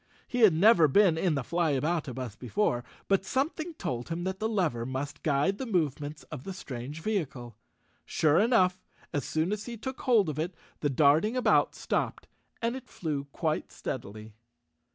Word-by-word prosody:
He 245 - -2
had 215 -7 +7
never 175 -2 +6
been 180 +3 +5
in 165 -1 +1
the 135 - -1
Flyaboutabus 145 - -1
before, 125 - 0 0.2
but 195 -1 +3
something 315 - -2
told 125 - -4
him 170 +1 -3
that 190 +1 -3
the 220 - 0
lever 170 - 0
must 130 +3 -4
guide 155 +7 +1
the 265 - -3
movements 155 - -1
of 125 - -6
the 195 - -5
strange 140 -3 -7
vehicle. 135 - -3 0.5
Sure 155 +1 +3
enough, 190 -5 +3 0.3
as 145 - -1
soon 160 +4 0
as 210 +2 -3
he 235 -1 -5
took 260 +4 -6
hold 230 -8 +4
of 155 -1 -3
it, 170 +3 -2 0.2
the 145 - 0
darting 155 - +3
about 250 - +3
stopped - - -2 0.4
and 235 +2 +1
it 260 -1 -9
flew 150 -5 -3
quite 155 +2 -2
steadily. 110 -3 -6
165 Hz, 170 wpm, -29 LUFS, 140-205 Hz, 0.5 s, had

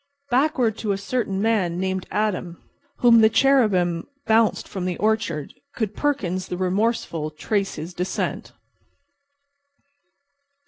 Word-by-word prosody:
Backward 250 -4 +2
to 210 -3 0
a - - -2
certain 200 -1 -2
man 190 -6 +1
named 190 0 -2
Adam, 190 -5 -2 0.4
whom 235 -2 +7
the 220 - +6
cherubim 210 -9 +2 0.2
bounced 220 -1 +2
from 190 -2 -5
the 180 -2 -2
orchard, 210 -9 -1 0.2
could 215 -3 -2
Perkins, 185 -11 -1
the 180 - -4
remorseful, 185 -4 -1
trace 195 +6 -2
his 160 +4 -7
descent. 180 +2 -3
200 Hz, 120 wpm, -23 LUFS, 180-225 Hz, 0.4 s, whom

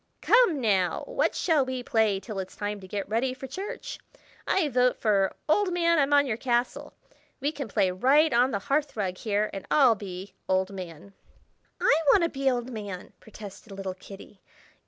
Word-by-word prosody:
"Come, 455 - +4
now! 195 -7 +1
what - - 0
shall 315 -6 +2
we 260 -1 -4
play 220 -4 +1
till 205 -1 -6
it's 185 - -6
time 205 0 -4
to 190 - -12
get 200 +1 -4
ready 240 +5 -1
for 265 - -8
church? 420 - -6 0.5
I 370 -5 +2
vote 250 -2 +2
for 200 -3 +1
'Old 370 +5 +2
Man 335 -2 +2
I'm 280 0 +2
on 285 0 +5
your 225 -5 -2
Castle!' 240 0 -1 0.5
We 285 +2 -1
can 280 -4 -6
play 200 -3 +1
right 270 - +3
on 245 +2 +4
the 210 - -1
hearth 280 +6 -1
rug 185 -3 -2
here, 210 -1 -1
and 195 - -6
I'll 265 -6 +5
be 190 -2 -8 0.2
'Old 190 +1 +1
Man.'" 185 0 -9 0.7
"I - - +4
want 350 - +5
to 335 - +2
be 275 -2 0
'Old 245 0 -2
Man!'" 205 -5 -7
protested 210 -1 -11
little 195 -1 -5
Kitty. 195 +1 -13
230 Hz, 185 wpm, -27 LUFS, 195-280 Hz, 0.7 s, on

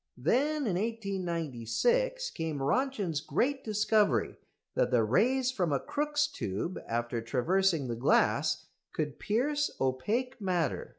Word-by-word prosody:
Then 275 - +1
in 185 -6 0
1896 195 - -1
came 160 -2 -3
Röntgen's 170 - 0
great 265 - 0
discovery 210 - +2 0.4
that - - +2
the 120 -3 +3
rays 250 - +2
from 180 - -1
a 140 - +2
Crookes' 295 - 0
tube, 140 - -4
after 120 0 -2
traversing 155 +6 +1
the 120 - -2
glass, 120 +4 +2 0.3
could 150 -2 -3
pierce 290 +7 0
opaque 215 - -1
matter. 180 -4 -1
185 Hz, 120 wpm, -30 LUFS, -, 0.4 s, the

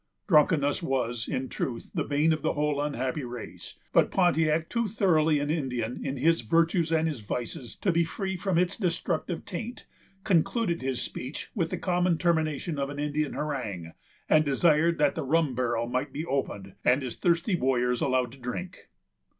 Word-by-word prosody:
Drunkenness 150 -4 +4
was, 120 -6 -1
in 130 +1 -2
truth, 120 -2 -4
the - - 0
bane 150 +3 +2
of 155 - -3
the - - 0
whole 150 -1 0
unhappy 140 -1 -2
race; 120 -2 -8 0.2
but - - +5
Pontiac, 160 -3 +2
too 235 -1 0
thoroughly 165 -7 +3
an 145 +1 -1
Indian 125 -6 -2
in 135 0 -3
his 165 +5 +3
virtues 165 - +2
and 160 0 +2
his 150 -6 -3
vices 120 +3 -5
to 190 - 0
be 170 0 +3
free 190 +3 -3
from 180 -1 -1
its 180 +1 +2
destructive 175 -3 -2
taint, 220 +6 -6 0.4
concluded 180 0 +1
his 130 -1 -1
speech 130 +4 -6
with 170 -6 -1
the 185 - -3
common 180 -1 +1
termination 160 -3 0
of 140 0 -1
an 145 - -6
Indian 150 0 -1
harangue, 105 - -4 0.3
and 155 0 +5
desired 155 +3 +3
that 150 -1 +3
the - - -3
rum 150 0 +1
barrel 120 -2 0
might 130 +3 -2
be 150 +4 -4
opened, 105 - -3
and 130 +3 +3
his 125 - -5
thirsty 175 +3 +2
warriors 125 -4 +1
allowed 130 -2 +1
to 135 - -14
drink. 150 +10 -6
150 Hz, 175 wpm, -28 LUFS, 130-170 Hz, 0.4 s, but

